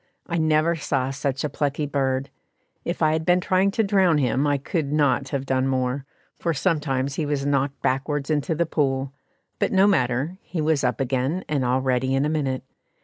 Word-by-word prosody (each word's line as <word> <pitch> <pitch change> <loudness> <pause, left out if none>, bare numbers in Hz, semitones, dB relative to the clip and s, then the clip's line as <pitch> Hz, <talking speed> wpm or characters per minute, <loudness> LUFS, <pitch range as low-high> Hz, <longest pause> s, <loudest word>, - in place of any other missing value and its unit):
I 170 -1 -2
never 155 +1 +2
saw 135 -4 -1
such 135 0 -2
a - - +1
plucky 145 +1 -1
bird. 135 -1 -1 0.5
If 170 -1 -2
I 155 - +4
had 160 0 0
been 180 +2 +3
trying 185 +2 +2
to 220 +3 +1
drown 190 -5 +3
him 140 +1 +1
I 145 -1 +2
could 145 +1 -2
not 145 -2 +2
have 140 -2 -2
done 130 0 +1
more, 130 +1 -1 0.3
for 170 -2 -1
sometimes 140 -5 0
he 155 - 0
was 145 -1 -1
knocked 140 -1 0
backwards 140 +2 -1
into 150 +2 0
the 170 +2 +1
pool; 135 -4 -1 0.5
but - - +1
no 190 0 +5
matter, 145 -1 +1
he 175 - -6
was 155 -2 +1
up 125 -3 0
again, 135 +7 -1
and 145 -3 0
all 125 +1 +1
ready 130 0 +1
in 135 +2 +2
a - - 0
minute. 140 -4 -1
145 Hz, 200 wpm, -24 LUFS, 135-160 Hz, 0.5 s, no